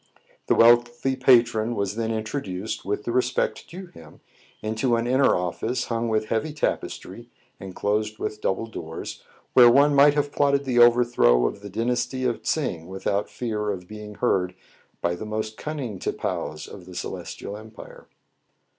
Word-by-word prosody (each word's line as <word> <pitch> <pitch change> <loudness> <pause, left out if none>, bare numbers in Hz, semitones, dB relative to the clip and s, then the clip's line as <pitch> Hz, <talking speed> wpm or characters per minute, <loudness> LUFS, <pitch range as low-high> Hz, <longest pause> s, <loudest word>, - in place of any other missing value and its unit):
The - - +3
wealthy 120 +2 +4
patron 120 -3 +3
was 100 -1 -2
then 115 0 -2
introduced, 110 -3 -4
with 105 +1 -2
the 120 - -3
respect 125 +1 0
due 185 +2 -9
him, 80 - -15 0.4
into 110 +3 0
an 115 0 -1
inner 130 +3 +3
office, 90 +8 -2
hung 115 0 -1
with 110 -1 0
heavy 115 +7 -1
tapestry, 150 - -4 0.3
and 95 -1 -9
closed 105 +1 -1
with 105 - -4
double 95 +4 -1
doors, 80 -8 -7 0.3
where 120 -2 +8
one 140 +4 +5
might 145 +1 +6
have 145 -1 0
plotted 140 -1 +2
the 125 -2 +1
overthrow 120 - +5
of 100 - -3
the 100 - -8
dynasty 120 +4 -1
of 120 -2 -1
Tsing 90 - -2
without 100 +2 -2
fear 105 -3 -3
of 90 -3 -4
being 105 0 -9
heard 90 -2 0 0.5
by 85 - 0
the 90 - -6
most 110 0 -4
cunning 130 -8 -5
tipaos 75 -3 -3
in 95 - -11
the 90 0 -11
Celestial 100 - -6
Em 110 +1 -10
pire. 110 - -13
115 Hz, 165 wpm, -24 LUFS, 100-125 Hz, 0.5 s, where